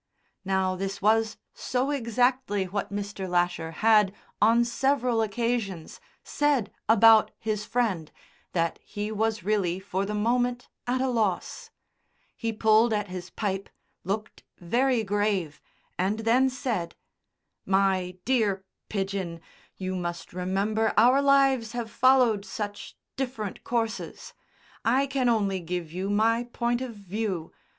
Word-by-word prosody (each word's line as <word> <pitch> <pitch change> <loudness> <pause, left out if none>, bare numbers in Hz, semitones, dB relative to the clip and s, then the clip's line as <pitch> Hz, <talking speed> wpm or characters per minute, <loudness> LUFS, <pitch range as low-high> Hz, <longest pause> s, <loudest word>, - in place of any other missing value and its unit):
'" - - -44
Now 190 -1 +1
this 195 +1 -4
was 220 +1 +2 0.2
so 255 +3 -1
exactly 245 -4 +1
what 200 +2 -4
Mr. 200 -2 -4
Lasher 175 -2 0 0.2
had, 210 -3 +6 0.3
on 230 +3 +5
several 250 -1 +1
occasions, 220 -5 -2 0.2
said 290 -7 +1 0.2
about 225 0 +7
his 215 -2 -3
friend 205 -11 -1 0.4
that 170 -1 0
he 210 +1 -5
was 220 -2 -1
really 190 -3 0
for 190 0 -2
the 210 +1 -3
moment 245 +3 0 0.2
at 255 +1 +1
a 265 - +1
loss. 220 -8 -1 0.7
He 230 -1 -2
pulled 220 +1 +4
at 210 -2 -1
his 180 0 -6
pipe, 195 -2 -3 0.3
looked 210 +3 -4 0.2
very 240 +6 +1
grave, 200 -6 -1 0.4
and 200 +4 0
then 245 +4 +3
said: 250 -10 -3 0.7
"My 190 -2 +1
dear 215 -7 +1 0.3
Pidgen, 195 -4 -3 0.4
you 185 0 -3
must 175 -2 -5
remember 200 +5 0
our 250 +5 +6
lives 270 -5 +3
have 235 -2 -4
followed 250 -5 +4
such 205 +1 -6 0.2
different 245 -7 -4
courses. 230 -2 -3 0.5
I 260 +5 +3
can 270 -2 0
only 200 -4 +1
give 175 -2 -4
you 185 +3 -3
my 225 +3 +2
point 240 0 -1
of 250 -3 -5
view. 200 -4 -4
215 Hz, 130 wpm, -27 LUFS, 190-240 Hz, 0.7 s, about